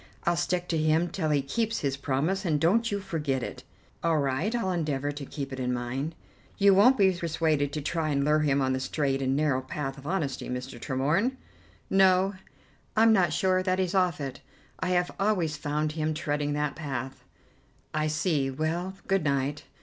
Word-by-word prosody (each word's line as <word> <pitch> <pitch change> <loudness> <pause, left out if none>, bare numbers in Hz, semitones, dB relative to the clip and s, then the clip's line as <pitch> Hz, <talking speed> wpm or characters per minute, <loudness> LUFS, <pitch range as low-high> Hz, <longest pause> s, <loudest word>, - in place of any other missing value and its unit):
I'll 170 - +2
stick 175 +1 -1
to 165 - +1
him 155 +3 +2
till 165 -4 -2
he 145 -2 +2
keeps 225 +11 -1
his 140 -2 0
promise, 145 +8 -1
and 155 -5 +1
don't 215 +9 +2
you 200 - 0
forget 150 -9 -2
it." - - -6 0.4
"All 165 -1 +3
right, 145 - 0
I'll 190 -6 0
endeavour 145 -5 -1
to 145 -1 -7
keep 140 -3 -5
it 130 - -5
in 125 -1 -1
mind." 130 +6 -3 0.4
"You 200 0 +6
won't 235 +8 +6
be 195 -3 +5
persuaded 160 -4 0
to 150 - -2
try 160 +1 -1
and 140 -1 +1
lure 150 +1 +4
him 140 -2 +2
on 130 - +1
to 130 - +1
the - - -3
straight 135 0 -1
and 135 0 +1
narrow 145 -3 +1
path 135 +1 -5
of 140 - -10
honesty, 160 -7 -2
Mr. 125 +1 -5
Tremorne?" 155 - 0 0.5
"No, 190 0 +4 0.6
I'm 225 0 +6
not 180 -6 +3
sure 185 +5 +2
that 185 0 0
he's 185 -1 0
off 180 -5 +2
it. 135 -2 -5 0.4
I - - -1
have 180 -1 +1
always 190 -7 +1
found 150 +1 -1
him 155 0 -1
treading 145 -2 -1
that 150 -1 -1
path." 135 -4 -5 0.7
"I 155 0 +1
see. 150 -2 0
Well, 165 +7 -2
good 195 -3 +2
night. 140 0 -1
155 Hz, 195 wpm, -28 LUFS, 140-185 Hz, 0.7 s, You